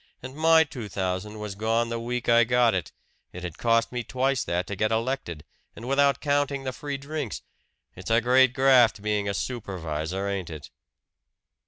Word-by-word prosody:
And 130 Hz, +1 st, -8 dB
my 160 Hz, +1 st, +5 dB
two 125 Hz, -9 st, -8 dB
thousand 95 Hz, +3 st, -3 dB
was 105 Hz, -1 st, -5 dB
gone 115 Hz, +3 st, 0 dB
the 115 Hz, 0 st, -3 dB
week 120 Hz, +1 st, -4 dB
I 115 Hz, 0 st, +6 dB
got 120 Hz, 0 st, +3 dB
it 90 Hz, -5 st, -3 dB, 0.4 s
it 90 Hz, -, -8 dB
had 85 Hz, -3 st, -7 dB
cost 115 Hz, -1 st, +2 dB
me 125 Hz, -1 st, -3 dB
twice 130 Hz, +1 st, 0 dB
that 90 Hz, +1 st, -1 dB
to 100 Hz, -, -5 dB
get 110 Hz, +3 st, 0 dB
elected 115 Hz, -, -2 dB, 0.3 s
and 115 Hz, -, -9 dB
without 140 Hz, 0 st, +3 dB
counting 145 Hz, -1 st, 0 dB
the 130 Hz, -1 st, -3 dB
free 145 Hz, +1 st, -5 dB
drinks. 140 Hz, -3 st, -5 dB, 0.5 s
It's 90 Hz, +3 st, -8 dB
a 115 Hz, +1 st, +4 dB
great 125 Hz, +2 st, +4 dB
graft, 125 Hz, -6 st, +4 dB
being 105 Hz, -1 st, 0 dB
a 100 Hz, -, -2 dB
supervisor, 90 Hz, -4 st, -4 dB
ain't 95 Hz, -3 st, -3 dB
it?" 75 Hz, -3 st, -9 dB
115 Hz, 180 wpm, -26 LUFS, 100-130 Hz, 0.5 s, I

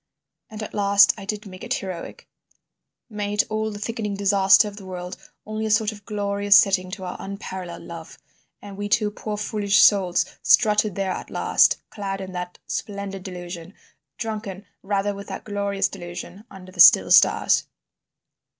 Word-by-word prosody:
And 215 Hz, -1 st, -7 dB
at -, -, -8 dB
last 200 Hz, 0 st, +5 dB
I 195 Hz, -, -10 dB
did 210 Hz, +1 st, -4 dB
make 185 Hz, -2 st, -11 dB
it -, -, -1 dB
heroic, 185 Hz, -3 st, -7 dB, 0.8 s
made 210 Hz, -2 st, -1 dB
all 215 Hz, 0 st, -1 dB
the 205 Hz, -, -7 dB
thickening 210 Hz, -1 st, -4 dB
disaster 195 Hz, +1 st, +4 dB
of 205 Hz, -1 st, -9 dB
the 195 Hz, -, -10 dB
world 180 Hz, 0 st, -6 dB, 0.3 s
only 215 Hz, +1 st, -3 dB
a -, -, -3 dB
sort 215 Hz, 0 st, +2 dB
of 205 Hz, -2 st, -14 dB
glorious 200 Hz, -1 st, +2 dB
setting 190 Hz, -2 st, +4 dB
to 190 Hz, -1 st, -7 dB
our 180 Hz, 0 st, -5 dB
unparalleled 190 Hz, -3 st, -7 dB
love, 165 Hz, -1 st, -10 dB, 0.5 s
and 200 Hz, -1 st, -10 dB
we 205 Hz, 0 st, -4 dB
two 210 Hz, 0 st, +2 dB
poor 210 Hz, 0 st, -5 dB
foolish 205 Hz, -1 st, +1 dB
souls 180 Hz, -3 st, +4 dB, 0.2 s
strutted 210 Hz, -2 st, +3 dB
there 195 Hz, -1 st, -1 dB
at -, -, -6 dB
last, -, -, +2 dB
clad 195 Hz, -2 st, -4 dB
in 190 Hz, -1 st, -7 dB
that 180 Hz, 0 st, -6 dB
splendid 200 Hz, -2 st, -5 dB
delusion, 180 Hz, -1 st, -8 dB, 0.4 s
drunken 210 Hz, -3 st, -5 dB, 0.2 s
rather 200 Hz, +1 st, -1 dB
with 200 Hz, 0 st, -9 dB
that -, -, -7 dB
glorious 200 Hz, -1 st, -1 dB
delusion, 180 Hz, +2 st, -9 dB
under 185 Hz, -2 st, -12 dB
the 185 Hz, -, -15 dB
still -, -, +8 dB
stars. -, -, +4 dB
200 Hz, 165 wpm, -23 LUFS, 190-210 Hz, 0.8 s, still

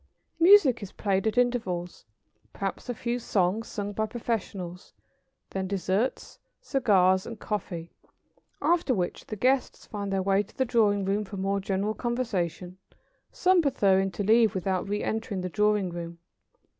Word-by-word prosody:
Music 335 Hz, -, +6 dB
is 200 Hz, -, -7 dB
played 195 Hz, 0 st, 0 dB
at 220 Hz, -, -1 dB
intervals, 190 Hz, -, -1 dB, 0.5 s
perhaps 195 Hz, +5 st, -4 dB
a -, -, 0 dB
few 240 Hz, +2 st, -2 dB
songs 205 Hz, 0 st, 0 dB
sung 205 Hz, -1 st, -4 dB
by 220 Hz, +1 st, -1 dB
professionals, 200 Hz, -6 st, -4 dB, 0.6 s
then 190 Hz, -1 st, -2 dB
dessert, 200 Hz, +5 st, -2 dB, 0.2 s
cigars, 190 Hz, -8 st, +2 dB
and 230 Hz, -2 st, -7 dB
coffee, 175 Hz, -5 st, -4 dB, 0.7 s
after 335 Hz, -7 st, +2 dB
which 180 Hz, -3 st, -3 dB
the 215 Hz, -, -5 dB
guests 255 Hz, +5 st, 0 dB
find 200 Hz, -2 st, -5 dB
their 190 Hz, -1 st, 0 dB
way 195 Hz, +1 st, +3 dB
to 205 Hz, -, -13 dB
the 260 Hz, -, +2 dB
drawing 205 Hz, -4 st, +2 dB
room 200 Hz, +2 st, 0 dB
for 200 Hz, 0 st, -8 dB
more 195 Hz, +1 st, 0 dB
general 195 Hz, +2 st, -1 dB
conversation, 190 Hz, -7 st, -3 dB, 0.5 s
some 370 Hz, -1 st, +3 dB
preferring 195 Hz, -9 st, +2 dB
to 205 Hz, -, -4 dB
leave 220 Hz, 0 st, +4 dB
without 185 Hz, 0 st, -1 dB
re 205 Hz, +1 st, -1 dB
entering 220 Hz, -3 st, -2 dB
the 185 Hz, -, -3 dB
drawing 210 Hz, -1 st, +1 dB
room. 170 Hz, 0 st, -6 dB
205 Hz, 150 wpm, -27 LUFS, 190-230 Hz, 0.7 s, Music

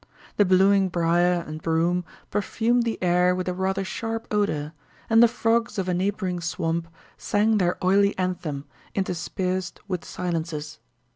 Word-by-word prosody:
The 205 Hz, -, +5 dB
blooming 190 Hz, +1 st, +4 dB
brier 175 Hz, 0 st, +2 dB
and 155 Hz, +1 st, -7 dB
broom 170 Hz, +2 st, +1 dB, 0.3 s
perfumed 225 Hz, +4 st, +1 dB
the 230 Hz, -, -1 dB
air 180 Hz, 0 st, +3 dB
with 185 Hz, 0 st, -3 dB
a 180 Hz, -, 0 dB
rather 190 Hz, +1 st, -1 dB
sharp 225 Hz, +3 st, -4 dB
odor, 155 Hz, -8 st, 0 dB, 0.4 s
and 225 Hz, 0 st, +7 dB
the 235 Hz, -, +8 dB
frogs 230 Hz, -1 st, 0 dB
of 190 Hz, -2 st, -1 dB
a 180 Hz, -, +1 dB
neighboring 185 Hz, 0 st, -1 dB
swamp 165 Hz, 0 st, -2 dB, 0.3 s
sang 210 Hz, +1 st, +2 dB
their 180 Hz, -1 st, +1 dB
oily 200 Hz, +2 st, +3 dB
anthem, 175 Hz, -6 st, -3 dB, 0.3 s
interspersed 185 Hz, 0 st, -2 dB
with 180 Hz, -3 st, -3 dB
silences. 160 Hz, -5 st, -4 dB
185 Hz, 145 wpm, -25 LUFS, 170-200 Hz, 0.4 s, the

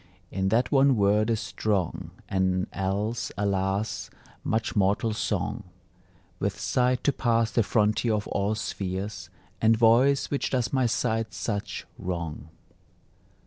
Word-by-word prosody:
In 95 Hz, 0 st, 0 dB
that 115 Hz, +4 st, +2 dB
one 135 Hz, -1 st, +5 dB
word 105 Hz, +1 st, +3 dB
is 115 Hz, -2 st, +1 dB
strong 100 Hz, -6 st, -2 dB, 0.2 s
An 95 Hz, -1 st, +1 dB
else, 100 Hz, +5 st, -2 dB
alas, 100 Hz, +1 st, -1 dB, 0.3 s
much 110 Hz, 0 st, -1 dB
mortal 105 Hz, +3 st, +2 dB
song; 105 Hz, 0 st, -2 dB, 0.8 s
With -, -, -2 dB
sight 125 Hz, -1 st, +1 dB
to 145 Hz, -, +2 dB
pass 115 Hz, -3 st, +1 dB
the 115 Hz, -, +3 dB
frontier 110 Hz, +1 st, +2 dB
of 105 Hz, -, -2 dB
all 100 Hz, +2 st, 0 dB
spheres, 95 Hz, -2 st, -4 dB, 0.3 s
And 110 Hz, 0 st, +4 dB
voice 120 Hz, +5 st, +4 dB
which 140 Hz, -, 0 dB
does 125 Hz, -1 st, -1 dB
my 130 Hz, -2 st, +3 dB
sight 115 Hz, -3 st, -1 dB
such 105 Hz, +1 st, -3 dB
wrong. 85 Hz, -4 st, -4 dB
105 Hz, 130 wpm, -27 LUFS, 95-115 Hz, 0.8 s, one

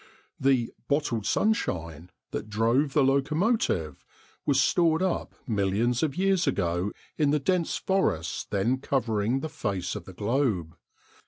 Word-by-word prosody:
The 130 Hz, -3 st, +2 dB
"bottled 140 Hz, -8 st, 0 dB
sunshine" 85 Hz, -, -1 dB, 0.2 s
that 110 Hz, -, -5 dB
drove 115 Hz, +7 st, +2 dB
the 150 Hz, -, +4 dB
locomotive 140 Hz, -, +1 dB, 0.4 s
was 140 Hz, -2 st, +3 dB
stored 165 Hz, +4 st, +3 dB
up 185 Hz, -2 st, -2 dB
millions 110 Hz, +2 st, +1 dB
of 150 Hz, -4 st, -1 dB
years 190 Hz, -3 st, +2 dB
ago 90 Hz, -5 st, 0 dB, 0.3 s
in 150 Hz, -2 st, +3 dB
the 150 Hz, -, +3 dB
dense 170 Hz, +4 st, 0 dB
forests 190 Hz, -, 0 dB
then 115 Hz, +6 st, +1 dB
covering 120 Hz, -2 st, 0 dB
the 160 Hz, -, -3 dB
face 100 Hz, -, -3 dB
of -, -, -6 dB
the 95 Hz, -, -10 dB
globe. 105 Hz, -, -1 dB
130 Hz, 135 wpm, -27 LUFS, 100-150 Hz, 0.4 s, the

